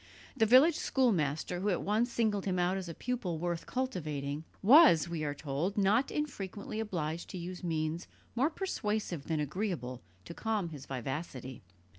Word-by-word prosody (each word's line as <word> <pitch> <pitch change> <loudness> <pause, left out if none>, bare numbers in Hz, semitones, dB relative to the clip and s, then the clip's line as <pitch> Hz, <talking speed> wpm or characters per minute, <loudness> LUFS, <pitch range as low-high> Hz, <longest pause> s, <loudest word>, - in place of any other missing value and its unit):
The 220 - +3
village 275 +8 +7
schoolmaster, 175 - +1
who 200 +3 0
at 180 - 0
once 220 +4 +1
singled 215 -4 0
him 185 -2 0
out 180 +1 +2
as 190 -3 -4
a 165 - -6
pupil 230 -9 -2
worth 170 0 -3
cultivating, 155 - -3 0.2
was, 235 - +8
we 170 -2 -3
are 145 -1 -2
told, 150 +8 -2
not 205 +6 +3
infrequently 215 -8 -4
obliged 170 -6 -3
to 190 - -6
use 180 +1 -6
means 160 0 -2 0.3
more 265 +6 +2
persuasive 215 - -2
than 160 -2 -1
agreeable 150 - -3 0.2
to - - -7
calm 215 -3 -1
his 145 -4 -9
vivacity. 130 -1 -5
180 Hz, 160 wpm, -32 LUFS, 155-220 Hz, 0.3 s, was